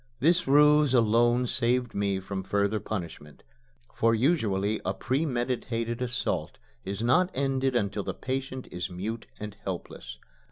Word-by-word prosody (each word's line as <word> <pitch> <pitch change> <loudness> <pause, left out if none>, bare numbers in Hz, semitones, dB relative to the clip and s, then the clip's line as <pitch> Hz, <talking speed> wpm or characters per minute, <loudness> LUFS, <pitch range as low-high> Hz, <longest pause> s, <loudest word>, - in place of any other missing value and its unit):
This 170 +5 +3
ruse 150 -1 +5
alone 120 +2 +4
saved 125 0 0
me 100 -1 0
from 95 0 -4
further 100 +2 0
punishment, 85 -8 -6 0.5
for 115 0 +3
usually 110 - +1
a 95 +1 -1
premeditated 120 -2 -1
assault 125 -1 -2 0.3
is 100 +3 -4
not 175 +10 +4
ended 135 -1 0
until 100 -3 0
the - - -4
patient 130 0 -4
is 90 +1 -4
mute 105 +6 -5
and 105 -1 -6
helpless. 90 -8 -6
115 Hz, 130 wpm, -28 LUFS, 100-130 Hz, 0.5 s, ruse